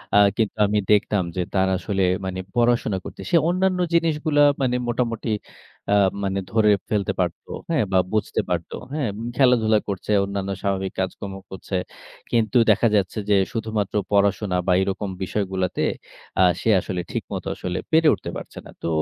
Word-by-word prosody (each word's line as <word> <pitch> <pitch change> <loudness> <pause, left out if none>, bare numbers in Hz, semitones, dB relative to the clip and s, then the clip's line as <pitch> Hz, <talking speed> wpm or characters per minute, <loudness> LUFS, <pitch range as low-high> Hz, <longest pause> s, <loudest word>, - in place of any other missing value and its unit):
আ - - +7 0.2
কিন্তু 110 -2 0
আমি 105 - 0
দেখতাম 105 -2 +3
যে, 90 - 0
তার 95 -1 +2
আসলে 95 +1 -1 0.2
মানে 95 0 -4 0.2
পড়াশোনা 120 -4 +2
করতে - - -8
সে 170 - +6
অন্যান্য 185 0 +1
জিনিসগুলা 155 -3 +2 0.2
মানে 125 -1 +1
মোটামুটি 115 -2 -1 0.6
আ - - +5 0.3
মানে 95 0 -1
ধরে 110 -1 +4 0.2
ফেলতে 105 -3 0
পারতো, - - -2 0.2
হ্যাঁ? 160 -8 +2
বা, 95 - +3 0.2
বুঝতে 110 - 0
পারতো, 85 -2 -2 0.2
হ্যাঁ? 145 -7 -1 0.3
খেলাধুলা 115 -5 +4
করছে, 100 +1 -4
অন্যান্য 100 0 -3
স্বাভাবিক 95 -1 -1
কাজকর্ম 95 +1 -4 0.2
করছে। 95 0 -6 0.6
কিন্তু 115 +1 +2
দেখা 110 +3 +3
যাচ্ছে 100 +1 0
যে, 100 - +5 0.2
শুধুমাত্র 110 -3 -2 0.2
পড়াশোনা 100 -1 +2
বা, - - +3
এরকম 100 +1 -2
বিষয়গুলোতে 95 -2 -2 0.6
আ - - +7 0.2
সে - - 0
আসলে 90 -1 -3
ঠিকমত - - -4
আসলে 90 0 -4
পেরে 160 0 +5
উঠতে - - -5
পারছে - - -10
না। - - -12
তো - - -1
105 Hz, 160 wpm, -23 LUFS, 95-120 Hz, 0.6 s, আ